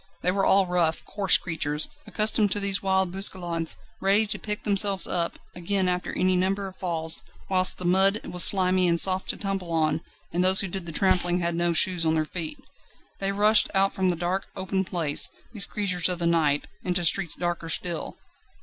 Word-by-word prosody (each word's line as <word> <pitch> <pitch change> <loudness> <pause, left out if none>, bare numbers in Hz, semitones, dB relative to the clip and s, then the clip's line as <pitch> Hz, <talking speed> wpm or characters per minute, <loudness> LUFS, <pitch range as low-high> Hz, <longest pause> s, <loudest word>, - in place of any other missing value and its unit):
They 180 - +2
were 195 +1 0
all 195 0 +4
rough, 175 -3 -1
coarse 200 -2 +3
creatures, 150 -3 -2 0.2
accustomed 215 -1 +2
to 205 - -1
these 200 -1 +1
wild 190 -2 0
bousculades, 175 -4 -1 0.2
ready 200 +3 +2
to 210 - -5
pick 210 -1 -4
themselves 200 -2 +1
up, 170 -2 -2 0.2
again 185 +2 -1
after 180 0 -2
any 185 0 +2
number 195 +2 -1
of 190 -1 -10
falls; 165 -3 -2 0.3
whilst 185 -1 +3
the 180 - -6
mud 190 +4 +3
was 180 -1 -1
slimy 185 -1 +4
and 170 -1 +2
soft 190 +1 +2
to - - -2
tumble 195 -3 -4
on, 155 -1 0 0.3
and 175 +1 0
those 185 +1 +6
who 195 - -3
did 185 -1 -5
the - - -6
trampling 180 0 +1
had 170 -1 -2
no 170 +1 0
shoes 175 +1 +2
on 160 0 +1
their 155 -1 0
feet. 170 - -6 0.6
They 195 0 -1
rushed 210 +2 +4
out 195 0 +2
from 190 -1 0
the 175 - 0
dark, 175 +3 -3
open 190 0 -2
place, 165 -5 +1 0.2
these 210 -3 +4
creatures 185 -4 +1
of 180 - 0
the 170 - -1
night, 155 -4 +1 0.2
into 180 -1 0
streets 170 -1 +2
darker 175 -1 -4
still. 170 0 -2
185 Hz, 195 wpm, -25 LUFS, 170-195 Hz, 0.6 s, those